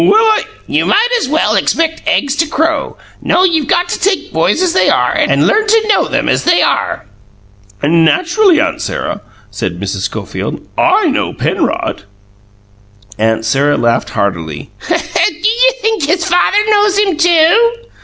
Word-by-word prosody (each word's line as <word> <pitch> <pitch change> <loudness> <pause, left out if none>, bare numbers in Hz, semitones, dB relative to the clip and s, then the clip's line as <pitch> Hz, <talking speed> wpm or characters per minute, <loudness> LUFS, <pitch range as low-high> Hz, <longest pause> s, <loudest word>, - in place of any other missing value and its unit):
"Well, 395 +5 +4
I 435 -1 +2
" - - -29
"You - - 0
might 450 +4 +2
as 345 - -3
well 315 +3 +1
expect 325 -1 0
eggs 290 -3 0
to 325 - +1
crow. 315 -1 -2 0.2
No; 365 - +1
you've 325 -6 +1
got 350 +1 +1
to - - -3
take 390 +1 -1
boys - - +1
as 360 - 0
they 185 - +2
are, 125 0 +1
and 140 +2 +1
learn 435 - +1
to 440 0 +2
know 410 - +2
them - - -2
as - - 0
they 350 0 +3
are." - - -1 0.8
"Naturally, 330 - +2
Aunt 325 +2 -1
Sarah," 205 - -4 0.3
said 95 -4 -5
Mrs. 95 0 -4
Schofield, 110 - -6
"I - - +2
KNOW - - -1
Penrod." - - -2 1.2
Aunt 110 0 0
Sarah 140 +5 +1
laughed 120 0 0
heartily. 80 -7 -4 0.2
"Do 345 - +2 0.5
you - - +3
think 440 -6 -1
his 340 +2 0
father 360 +3 +2
knows 415 -2 +2
him, 400 -4 +1
too?" 345 +8 +3
330 Hz, 165 wpm, -13 LUFS, -, 1.2 s, Well